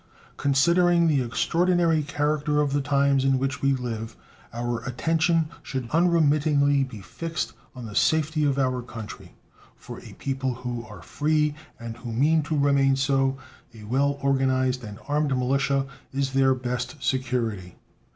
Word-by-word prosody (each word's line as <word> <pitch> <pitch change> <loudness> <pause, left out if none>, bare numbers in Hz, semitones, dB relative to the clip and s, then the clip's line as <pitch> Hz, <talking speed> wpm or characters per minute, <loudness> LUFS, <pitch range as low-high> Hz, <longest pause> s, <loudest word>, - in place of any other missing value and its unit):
Considering 170 +5 +3
the 145 -4 +2
extraordinary 165 +6 +1
character 150 0 0
of 145 -2 +1
the 145 - +1
times 140 -1 +2
in 135 -1 +3
which 135 +2 -2
we 140 - +3
live, 115 -4 -3 0.4
our 120 0 -3
attention 160 +5 +1
should 130 -3 -4
unremittingly 150 -4 +3
be 120 -6 -7
fixed 165 - -4 0.2
on 125 -2 -8
the 105 - -8
safety 155 +6 +2
of 140 -2 +1
our 130 -2 0
country. 115 -3 -9 0.4
For - - -10
a - - -12
people 130 -2 -3
who 120 -1 -5
are - - -12
free, 150 0 0 0.3
and 115 -1 -7
who 120 0 -7
mean 150 +7 +3
to 155 - 0
remain 140 -1 +3
so, 135 0 +1 0.4
a 110 - -11
well 140 +6 0
organized 130 -2 +1
and 105 -2 -8
armed 145 -2 +1
militia 135 +2 +1 0.3
is 135 -1 -2
their 135 -1 +4
best 125 +1 -4
security. 120 -9 -2
135 Hz, 150 wpm, -25 LUFS, 125-150 Hz, 0.4 s, their